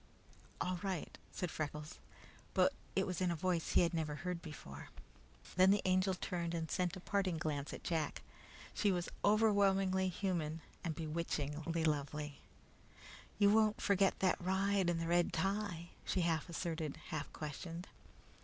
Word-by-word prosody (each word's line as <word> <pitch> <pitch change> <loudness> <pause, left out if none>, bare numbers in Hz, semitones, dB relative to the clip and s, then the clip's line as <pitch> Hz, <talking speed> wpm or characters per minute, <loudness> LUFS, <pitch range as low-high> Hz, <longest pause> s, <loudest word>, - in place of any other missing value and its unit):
"All 180 -1 -1
right," 190 -4 -3 0.2
said 180 -5 -3
Freckles, 150 +1 -4 0.6
but - - +5 0.2
it - - +3
was 180 -2 -3
in 180 - +3
a 170 - 0
voice 175 0 0
that - - +8
he 175 - +5
never 155 -2 -1
had 150 - -9
heard 180 -2 -2
before. 140 - -9 0.7
Then 185 +1 +7
the 200 +1 +4
Angel 185 0 +3
turned 170 -2 -2
and 160 -1 -3
sent 180 -3 0
a - - -7
parting 185 -2 0
glance 150 -3 -2
at - - -7
Jack. 160 -4 -1 0.5
She 205 - +2
was 175 -2 -1
overpoweringly 195 -3 +4
human 165 -4 -1 0.2
and 165 -3 -2
bewitchingly 160 0 -2
lovely. 150 -1 -1 1.0
"You 205 -1 +6
won't 215 0 +4
forget 195 -1 +3
that 185 -1 +3
ride 190 0 +2
and 170 -1 +1
the 165 - -1
red 175 +1 +3
tie," 195 -4 -1
she 185 - 0
half 165 0 +1
asserted, 165 -3 -3
half 150 -2 -3
questioned. 165 +4 -6
175 Hz, 155 wpm, -37 LUFS, 160-190 Hz, 1.0 s, that